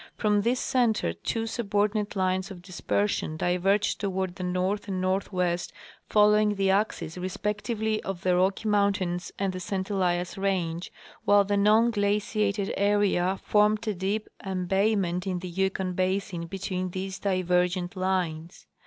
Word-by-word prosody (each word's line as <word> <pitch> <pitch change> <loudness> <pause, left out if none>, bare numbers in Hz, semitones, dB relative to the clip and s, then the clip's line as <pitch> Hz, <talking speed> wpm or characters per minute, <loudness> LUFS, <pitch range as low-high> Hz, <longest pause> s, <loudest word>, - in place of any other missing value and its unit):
From 210 -1 +2
this 240 +4 +1
center 225 - +1
two 225 - -3
subordinate 210 -2 -1
lines 185 0 0
of 180 -3 -10
dispersion 185 -2 -1
diverged 195 +5 +1
toward 190 -2 -1
the 185 0 -7
north 185 +3 -1
and 190 -2 -2
northwest, 185 -2 -1 0.4
following 210 0 +4
the 195 -1 +2
axes 185 -4 -1
respectively 210 +4 -2
of 190 -3 -5
the 180 -1 +3
Rocky 190 +4 +1
mountains 200 -4 +1
and 195 -1 -1
the 185 - -5
St 190 +1 -3
Elias 180 -1 0
range, 180 -3 -1 0.3
while 205 0 +5
the 205 +1 0
non 215 +4 +4
glaciated 205 -1 0
area 195 -2 +2
formed 210 +1 +2
a 215 - +1
deep 195 +4 -2 0.2
em 185 -2 -3
bayment 190 -2 +1
in 185 -1 -1
the 180 +1 -6
Yukon 190 0 -1
basin 185 -1 -1
between 185 0 -3
these 190 +1 -5
divergent 180 -2 0
lines. 180 -3 -2
195 Hz, 145 wpm, -27 LUFS, 180-205 Hz, 0.4 s, while